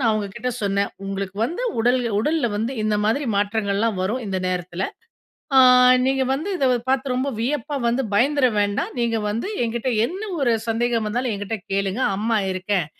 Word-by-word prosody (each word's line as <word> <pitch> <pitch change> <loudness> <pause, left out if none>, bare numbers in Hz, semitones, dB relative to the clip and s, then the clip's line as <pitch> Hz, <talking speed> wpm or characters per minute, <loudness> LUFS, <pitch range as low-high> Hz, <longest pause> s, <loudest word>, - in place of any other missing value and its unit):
நான் 230 -4 +3
அவங்ககிட்ட 215 +4 -3
சொன்ன, 200 0 +1 0.2
உங்களுக்கு 195 0 -4
வந்து 345 - -3 0.2
உடல் 245 +3 +3 0.2
உடல்ல 300 +3 +1
வந்து 225 +5 -2
இந்த 215 -1 +1
மாதிரி 275 +7 +1
மாற்றங்கள்லாம் 205 0 0
வரும். 220 +7 -1
இந்த 190 -1 -2
நேரத்தில, 180 0 -3 0.7
அ - - +7 0.5
நீங்க 265 0 +2
வந்து 315 +9 -3
இத 275 - +1 0.2
பார்த்து 265 0 +1
ரொம்ப 260 +2 0
வியப்பா 285 +4 -2
வந்து 245 +3 +1
பயந்துற 275 +4 +3 0.2
வேண்டாம். 205 0 -1
நீங்க 230 -1 +1
வந்து 225 - -2 0.2
என்கிட்ட 235 +2 -2 0.2
என்ன 380 +4 -7 0.2
ஒரு 240 -4 +3 0.2
சந்தேகம் 230 -1 0
வந்தாலும் 245 +2 -1
என்கிட்ட 205 +2 -4
கேளுங்க, 195 +4 -1 0.2
அம்மா 220 +1 +1
இருக்கேன். 185 -2 -1
225 Hz, 160 wpm, -22 LUFS, 200-255 Hz, 0.7 s, அ